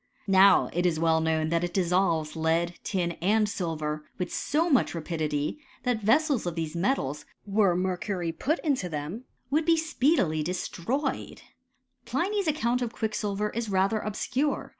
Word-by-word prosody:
* - - -33
Now 195 0 +6
it 175 +1 +2
is 160 -3 0
well 160 0 +3
known 160 -1 +1
that 170 +1 +1
it 175 0 -3
dissolves 175 -4 +1
lead, 165 +2 +1
tin, 180 -4 -1
and 210 +4 +3
silver 155 -6 -3
with 180 - -3
so 320 +4 0
much 270 - +2
rapidity, 155 - -2 0.2
that 245 -3 0
vessels 270 - +2
of 170 - -3
these 160 -1 -3
metals, 170 - -1 0.2
were 200 -3 +3
mep» 180 0 -1
cury 185 -5 -2
put 305 - 0
into 270 - 0
them, 160 - -5 0.3
would 310 +3 +3
be 330 +1 +4
speedily 280 - +1
destroyed* 180 - -3 0.6
Pliny's 395 +1 -1
account 250 -5 +1
of 240 -2 -2
quicksilver 210 -2 -2
is 230 -1 -3
rather 195 +3 +2
obscure. 250 +7 -2
190 Hz, 160 wpm, -27 LUFS, 165-240 Hz, 0.6 s, Now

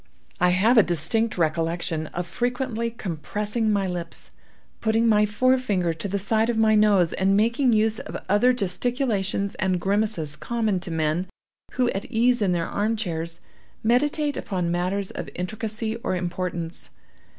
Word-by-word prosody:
I 180 - +4
have 215 +7 +4
a - - +9
distinct 190 +6 +1
recollection 165 -1 -1
of 175 +3 -4
frequently 240 +4 -2
compressing 210 +3 -2
my 200 -2 +1
lips, 170 - -5 0.5
putting 225 +1 +2
my 210 -1 +4
forefinger 210 -6 +1
to 160 +4 -5
the 200 +1 -1
side 220 +3 +1
of 235 - 0
my 220 -1 +4
nose, 205 -5 +4
and 195 +1 +2
making 235 +4 +2
use 220 0 +2
of - - -6
other 205 +6 +4
gesticulations 200 -2 -1
and 185 -1 +1
grimaces 195 -6 0
common 215 +4 -1
to 180 - -5
men 160 +2 0 0.5
who, 250 -1 +1
at 195 - -4
ease 240 +1 +2
in 195 -3 +2
their 170 -2 0
arm 215 +3 0
chairs, 170 -5 -4 0.4
meditate 290 +5 +1
upon 180 -4 -2
matters 185 +3 -1
of - - -6
intricacy 220 +4 -3
or 230 - -2
importance. 175 -1 -4
200 Hz, 150 wpm, -24 LUFS, 175-225 Hz, 0.5 s, a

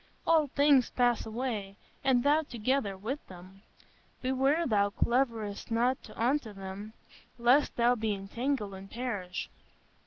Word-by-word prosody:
All 320 -3 +4
things 280 -2 +4
pass 245 -3 +1
away, 220 -4 -3 0.3
and 255 -2 +3
thou 295 +2 +4
together 240 -6 -1
with 245 +9 -4
them. 185 +2 -13 0.6
Beware 270 +6 +2
thou 205 -5 +2
cleavest 230 -2 -1
not 240 +3 0
unto 245 -1 0
them, 195 +2 -8 0.4
lest 245 +5 +3
thou 240 +1 +4
be 220 -3 -1
entangled 210 +2 -3
and 190 +1 -10
perish.... 205 -7 -4
235 Hz, 125 wpm, -30 LUFS, 200-265 Hz, 0.6 s, All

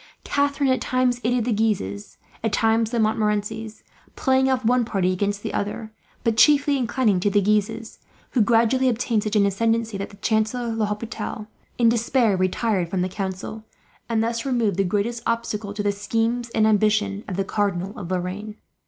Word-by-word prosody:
Catharine 285 -1 +1
at 255 - +1
times 255 -1 +1
aided 240 0 +1
the 240 - +1
Guises, 200 - -2 0.3
at 225 - 0
times 225 +1 +2
the 240 - -2
Montmorencys; 215 0 -1 0.3
playing 265 0 +2
off 255 -2 0
one 245 +1 +3
party 190 -5 0
against 205 +2 -2
the - - -4
other, 215 +2 -3 0.3
but 230 -2 +1
chiefly 290 +1 +5
inclining 240 -6 +1
to 205 - +1
the 205 +1 +3
Guises, 215 +2 -1 0.3
who 250 - +2
gradually 235 +4 +3
obtained 230 -2 0
such 215 +1 -3
an 205 -1 +4
ascendency 225 +1 0
that 200 - -4
the 200 - -15
Chancellor 220 +3 0
L'Hopital, 215 0 -3 0.3
in 235 - +4
despair, 230 -1 +2
retired 185 0 0
from 180 0 -1
the 185 - -2
council; 195 +3 -5 0.5
and 225 -1 +1
thus 230 0 -2
removed 235 -8 0
the 195 - +3
greatest 210 +5 -1
obstacle 220 -3 -2
to 205 0 -4
the 205 - +2
schemes 230 +4 -1
and 220 -2 +2
ambition 210 -1 +2
of 185 - -4
the 195 - 0
Cardinal 195 -2 -1
of 180 - -7
Lorraine. 185 +4 -3
220 Hz, 175 wpm, -23 LUFS, 205-235 Hz, 0.5 s, chiefly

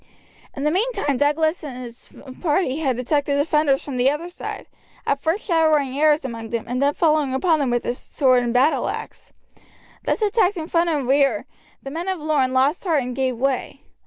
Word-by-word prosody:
In 275 - -4
the 300 - +2
meantime 395 - 0
Douglas 315 +4 +1
and 270 -5 -7
his 240 -1 -10 0.3
party 305 -4 0
had 265 -6 0
attacked 285 +3 0
the 285 - +1
defenders 285 -1 +2
from 275 -3 -5
the 250 +2 +4
other 305 +5 -3
side, 355 - -7 0.4
at 280 0 0
first 335 +6 -1
showering 310 -6 +2
arrows 300 0 +3
among 230 -3 -6
them, 230 -1 -3
and 250 +2 -2
then 285 +1 +2
falling 305 -5 +2
upon 320 +3 +2
them 275 -3 0
with 240 0 -1
sword 255 -1 +2
and 240 -1 -1
battleaxe. 260 +6 -1 0.7
Thus 435 - 0
attacked 410 -2 +2
in 320 -1 -4
front 340 0 +2
and 290 -6 -1
rear, 275 +1 +2 0.4
the 270 - -7
men 335 +5 -4
of 380 -1 -1
Lorne 295 -4 +1
lost 265 +5 +1
heart 320 -8 +1
and 250 0 -5
gave 260 -2 -1
way. 270 +2 -2
285 Hz, 190 wpm, -22 LUFS, 260-320 Hz, 0.7 s, the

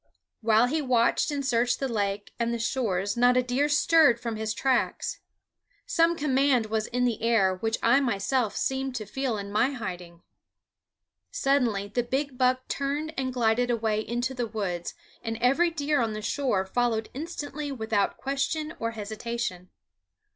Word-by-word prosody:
While 220 +1 +4
he 305 +5 0
watched 245 -1 +2
and 285 -2 -2
searched 245 -1 +1
the 270 - -1
lake 205 -3 -2
and 235 0 0
the 235 - -1
shores 215 -5 -1
not 245 +1 +4
a 255 - +3
deer 255 +4 +1
stirred 295 -4 +5
from 235 -2 -4
his 220 0 -2
tracks. 260 -1 0 0.7
Some 335 +1 +3
command 270 -4 +2
was 215 0 -1
in 250 +1 0
the 235 -3 -1
air 220 -5 +3
which 225 +4 -1
I 240 +4 +5
myself 240 -1 0
seemed 265 -1 -1
to 220 -3 -4
feel 255 +1 -2
in 200 0 -6
my 260 +7 +2
hiding. 180 -7 -7 1.1
Suddenly 235 -8 +1
the 245 +4 0
big 265 +3 -2
buck 255 0 +1
turned 290 +3 -2
and 260 -1 -2
glided 245 0 +1
away 220 -2 0
into 240 +3 -2
the 245 -2 -2
woods, 190 -6 -4 0.3
and 225 -1 -4
every 270 +9 +3
deer 295 -4 0
on 225 -2 -1
the 215 0 -6
shore 225 -6 0
followed 225 +1 0
instantly 295 -1 -5
without 220 -5 0
question 280 +4 -2
or 230 0 -2
hesitation. 215 -3 -4
240 Hz, 160 wpm, -27 LUFS, 220-270 Hz, 1.1 s, stirred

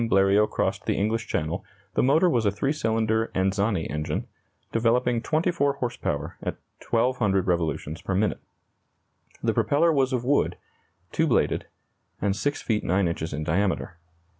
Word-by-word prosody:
Bleriot 100 +2 +4
crossed - - -2
the - - +2
English 110 +3 0
Channel, 85 +2 -2 0.3
the - - +2
motor 155 +7 +4
was 120 -9 +2
a - - +3
3 135 +8 -1
cylinder 110 -4 0
Anzani 95 -1 +1
engine, 75 0 -3 0.5
developing 115 +1 +2
24 155 -1 +1
horse 125 -3 -3
power 75 +3 -3
at - - -3 0.3
1,200 115 -5 +2
revolutions 80 -3 -1
per 95 - -2
minute. 105 +1 +1 1.0
The - - +2
propeller 160 +3 +3
was 135 -2 +2
of 125 -2 -1
wood, 145 +2 +2 0.5
2 160 - +1
bladed, 130 - +1 0.5
and 100 -1 0
6 145 +8 -1
feet 110 -2 0
9 95 +1 +2
inches 80 -1 -3
in 75 0 -3
diameter. 85 +1 -1
110 Hz, 150 wpm, -26 LUFS, 95-125 Hz, 1.0 s, Bleriot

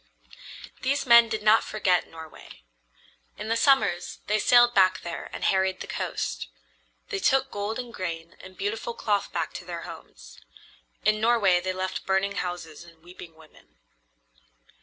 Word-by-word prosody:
These 280 +3 0
men 235 -2 +7
did 215 -1 -3
not 215 +1 +5
forget 185 -5 0
Norway. 160 - -13 0.7
In 220 - -6
the 230 - +2
summers 265 -9 +2
they 215 +1 +1
sailed 240 +2 +5
back 185 -2 +4
there 170 0 -6
and - - -7
harried 190 -1 +1
the - - -6
coast. - - -4 0.6
They 405 - -2
took 270 -6 +2
gold 205 +2 -3
and 245 -2 -7
grain 170 -3 -6
and 185 0 -13
beautiful 220 +4 -3
cloth 205 -2 -1
back - - -3
to - - -7
their - - -7
homes. - - -12 0.7
In 215 0 +2
Norway 220 -6 +3
they 185 +1 -3
left 185 0 -4
burning 195 +1 0
houses 175 -6 -5
and 165 -2 -19
weeping 175 -2 -12
women. 160 -1 -20
195 Hz, 155 wpm, -26 LUFS, 175-225 Hz, 0.7 s, men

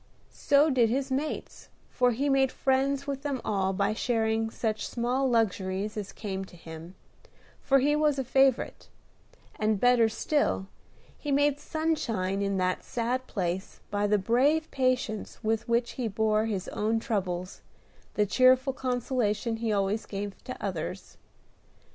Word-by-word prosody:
So 290 +1 +3
did 240 -4 +3
his 265 +3 -1
mates, 285 +4 -4 0.2
for 250 -1 +3
he 255 +5 0
made 270 -1 +3
friends 270 +1 +1
with 275 -1 -3
them 280 -3 -2
all 195 -2 +1
by 200 +2 0
sharing 225 -1 0
such 220 -2 -2
small 250 +3 0
luxuries 205 -3 0
as 205 -2 -5
came 195 -3 -4
to 190 - -16
him, 165 +2 -10 0.7
for 275 - +4
he 290 +3 +3
was 300 -2 +2
a 270 - 0
favorite; 265 0 +1 0.7
and, 215 -1 +1
better 245 -1 +5
still, 285 -4 0 0.5
he 295 - -3
made 285 0 +3
sunshine 230 - -1
in 200 -1 0
that 185 0 0
sad 245 +2 -2
place 185 -1 -3
by 205 0 +1
the 210 0 +3
brave 265 +10 +2
patience 255 -5 -1
with 220 +1 -1
which 235 0 +1
he 250 -3 -3
bore 215 +1 +1
his 195 -4 -3
own 220 +2 0
troubles, 185 -6 -3 0.5
the 210 - +3
cheerful 255 +5 +4
consolation 245 -3 -1
he 225 -1 -1
always 205 +1 0
gave 200 0 -6
to 255 - -6
others. 185 -1 -5
225 Hz, 150 wpm, -28 LUFS, 205-265 Hz, 0.7 s, better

